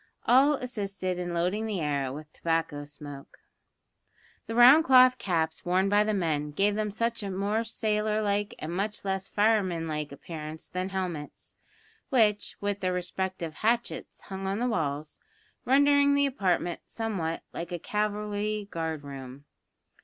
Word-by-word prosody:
All 270 +4 +5
assisted 200 -8 -3
in 175 -1 -3
loading 180 +6 0
the 205 -4 -2
air 140 -4 -1
with 150 +2 -9
tobacco 165 -3 -1
smoke. 145 -1 -10 1.1
The 225 - -4
round 255 +7 +8
cloth 255 -2 +6
caps 160 -4 -1
worn 185 +2 +2
by 205 +1 +4
the 215 0 0
men 155 -5 0
gave 200 +6 +2
them 215 0 -1
a - - -8
much 230 -1 0
more 200 +3 -1
sailor 215 -1 0
like 205 0 0
and 160 +2 -5
much 205 +2 -2
less 190 0 -2
fireman 200 -6 +1
like 150 -2 -3
appearance 155 +2 -8
than 185 0 -3
the 195 - -10
helmets, 175 -6 -5 0.5
which, 215 -7 +2
with 205 0 -2
their 185 -2 0
respective 180 -2 -3
hatchets, 230 +7 -1
hung 195 -1 -6
on 195 +1 -1
the 245 +2 0
walls, 150 - -2 0.5
rendering 285 +1 +5
the 280 0 +4
apartment 185 -9 0
somewhat 195 -8 -3
like 170 +1 -5
a 175 - -2
cavalry 210 +1 -2
guard 160 -3 -3
room. 135 0 -9
195 Hz, 155 wpm, -28 LUFS, 165-215 Hz, 1.1 s, round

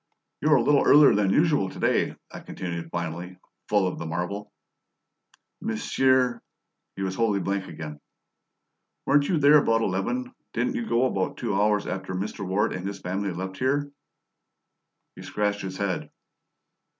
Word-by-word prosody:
"You 150 - +2
were 150 - +7
a 125 - +3
little 145 +2 +4
earlier 145 0 +7
than 100 -1 +2
usual 145 - +3
to - - -11
day," - - +1 0.2
I - - -8
continued 85 -2 -6
finally, 85 +2 -5 0.3
full 105 -2 +3
of 90 - -4
the 80 - -5
marvel. 90 +5 -4 1.1
"Monsieur?" 125 +2 +1 0.5
He 95 - -4
was 95 -1 -2
wholly 105 0 +1
blank 95 0 -2
again. 75 -2 -8 1.1
"Weren't 145 0 +3
you 175 - +2
there 150 +1 +7
about 115 -4 +2
eleven? 250 - -2 0.2
Didn't 260 - 0
you 240 -3 -3
go 120 +2 +3
about 95 -7 -1
two - - -2
hours 105 +1 +2
after 95 0 -4
Mr. 100 +2 -4
Ward 95 +3 0
and 90 +1 -4
his 100 0 -5
friends 95 0 -3
left 95 +1 -5
here?" 145 +2 0 1.2
He - - -11
scratched 105 -1 -1
his 95 -1 -5
head. 100 -2 -2
100 Hz, 160 wpm, -26 LUFS, 95-130 Hz, 1.2 s, were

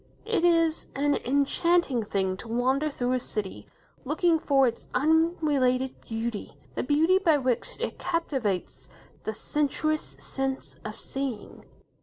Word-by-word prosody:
It 450 -6 +1
is 330 -2 +3
an 285 +1 +2
enchanting 280 +1 +2
thing 190 -2 0
to 230 - -9
wander 260 +6 +1
through 250 -3 -2
a 255 - +2
city 210 -5 -5 0.4
looking 345 -3 +2
for 275 -3 +4
its 235 -2 -2
unrelated 290 -4 +2
beauty, 225 -1 -4 0.2
the - - -1
beauty 320 +7 +3
by 330 -6 +4
which 255 -3 -1
it - - -3
captivates 270 - -2 0.4
the 220 - -2
sensuous 300 +4 -1
sense 270 0 -3
of - - -5
seeing. 270 -5 -5
275 Hz, 130 wpm, -27 LUFS, 245-320 Hz, 0.4 s, for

